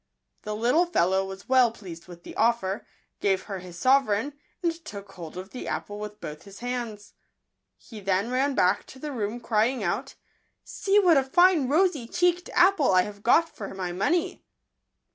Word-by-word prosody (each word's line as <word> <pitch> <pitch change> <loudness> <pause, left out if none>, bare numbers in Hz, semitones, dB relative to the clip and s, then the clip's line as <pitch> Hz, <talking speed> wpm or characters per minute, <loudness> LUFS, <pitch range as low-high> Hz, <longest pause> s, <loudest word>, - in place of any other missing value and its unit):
The 210 0 -4
little 250 +11 +2
fellow 190 - +2
was 190 0 -9
well 255 -3 +5
pleased 180 -7 -11
with 175 -1 -12
the - - -10
offer, 220 -4 0 0.3
gave 195 -2 +1
her 195 -3 -6
his 180 -1 -11
sovereign, 260 +2 +2 0.3
and 340 -1 +2
took 200 -9 -9
hold 170 -2 -9
of 185 +2 -8
the 255 - -7
apple 205 0 -4
with 210 0 -7
both 150 -2 -7
his 200 -1 -13
hands. 235 -4 -5 0.6
He 220 - -12
then 195 +3 0
ran 265 +2 +1
back 180 +2 +2
to - - -12
the 295 +3 -6
room, 225 -2 -3
crying 230 +1 +1
out, 210 +10 -2 0.2
" - - -46
See 400 +1 0
what 360 -7 +6
a 270 - +4
fine 345 0 +4
rosy 305 -4 +2
cheeked 355 +3 +1
apple 355 -5 +4
I 185 -1 +5
have 205 0 -9
got 325 +9 +4
for 200 -2 -7
my 185 -2 -3
money 290 - -1
225 Hz, 180 wpm, -26 LUFS, 195-275 Hz, 0.6 s, what